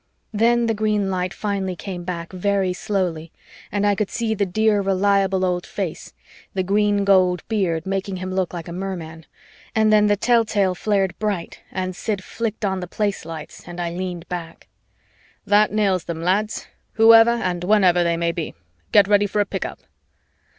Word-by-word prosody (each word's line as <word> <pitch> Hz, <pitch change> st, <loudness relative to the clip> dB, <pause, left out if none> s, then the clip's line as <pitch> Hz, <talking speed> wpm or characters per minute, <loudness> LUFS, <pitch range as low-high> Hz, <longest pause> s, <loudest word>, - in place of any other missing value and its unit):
Then 235 Hz, +2 st, +3 dB
the 225 Hz, -, +1 dB
green 210 Hz, -2 st, 0 dB
light 180 Hz, -1 st, -1 dB
finally 195 Hz, -3 st, -3 dB
came 180 Hz, -1 st, -6 dB
back 170 Hz, 0 st, -5 dB
very 190 Hz, 0 st, 0 dB
slowly 180 Hz, -5 st, -2 dB, 0.4 s
and 205 Hz, 0 st, 0 dB
I 205 Hz, -, +4 dB
could 200 Hz, 0 st, -1 dB
see 230 Hz, -2 st, -1 dB
the 200 Hz, -2 st, 0 dB
dear 215 Hz, +2 st, +2 dB
reliable 195 Hz, -1 st, +2 dB
old 180 Hz, -1 st, -1 dB
face 180 Hz, -4 st, -5 dB, 0.4 s
the 190 Hz, -, +1 dB
green 205 Hz, +1 st, +2 dB
gold 185 Hz, -3 st, +3 dB
beard 180 Hz, -7 st, 0 dB
making 195 Hz, 0 st, -2 dB
him 185 Hz, 0 st, -5 dB
look 185 Hz, -2 st, -1 dB
like 170 Hz, -2 st, -7 dB
a 170 Hz, -, -6 dB
merman 170 Hz, -4 st, -6 dB, 0.5 s
and 220 Hz, -1 st, +4 dB
then 210 Hz, 0 st, +5 dB
the 205 Hz, -, +3 dB
telltale 215 Hz, -4 st, +2 dB
flared 195 Hz, 0 st, 0 dB
bright 205 Hz, -5 st, -3 dB
and 185 Hz, -1 st, -3 dB
Sid 200 Hz, -1 st, -3 dB
flicked 220 Hz, 0 st, -3 dB
on 190 Hz, -1 st, -1 dB
the 180 Hz, -, -5 dB
Place 205 Hz, 0 st, -2 dB
lights 160 Hz, 0 st, -9 dB
and 175 Hz, 0 st, -8 dB
I 170 Hz, -1 st, -2 dB
leaned 180 Hz, -1 st, -5 dB
back. 170 Hz, -2 st, -7 dB, 0.8 s
"That 210 Hz, +1 st, +4 dB
nails 200 Hz, -4 st, +1 dB
them, 165 Hz, -1 st, -5 dB
lads, 205 Hz, +4 st, 0 dB, 0.3 s
whoever 225 Hz, +1 st, +7 dB
and 180 Hz, -7 st, -1 dB
whenever 180 Hz, -3 st, +4 dB
they 170 Hz, -1 st, +1 dB
may 170 Hz, 0 st, 0 dB
be. 170 Hz, -2 st, -5 dB, 0.4 s
Get 205 Hz, -1 st, +6 dB
ready 205 Hz, 0 st, +4 dB
for 210 Hz, -, -2 dB
a 205 Hz, -, +3 dB
pick -, -, -4 dB
up." -, -, -7 dB
195 Hz, 180 wpm, -22 LUFS, 180-210 Hz, 0.8 s, whoever